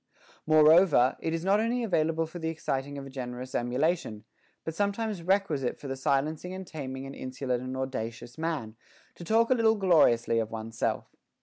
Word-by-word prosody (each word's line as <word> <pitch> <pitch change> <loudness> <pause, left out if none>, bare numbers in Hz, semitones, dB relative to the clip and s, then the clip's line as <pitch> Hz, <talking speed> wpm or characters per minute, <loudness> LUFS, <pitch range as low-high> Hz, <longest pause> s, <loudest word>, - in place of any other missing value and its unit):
16. 155 - +3
Moreover, 155 -4 +6
it 160 - -2
is 165 +1 -3
not 200 +2 +4
only 235 +2 0
available 165 -5 +1
for 165 +2 -9
the 160 -1 -2
exciting 140 -3 -3
of 140 - -6
a - - -9
generous 125 -1 -6
emulation, 125 -2 -1 0.4
but 160 - -4
sometimes 205 +1 -1
requisite 165 -8 0
for 145 - -8
the 135 - -3
silencing 150 +6 -1
and 190 0 -7
taming 135 -5 -6
an 135 - -7
insolent 130 -2 -3
and 130 +1 -5
audacious 120 -2 -5
man, 155 -9 -3 0.4
to - - -11
talk 225 +6 +2
a - - +8
little 225 -2 +3
gloriously 150 - +4
of 110 -1 -2
one's 110 0 -7
self. - - -2
150 Hz, 185 wpm, -28 LUFS, 130-180 Hz, 0.4 s, a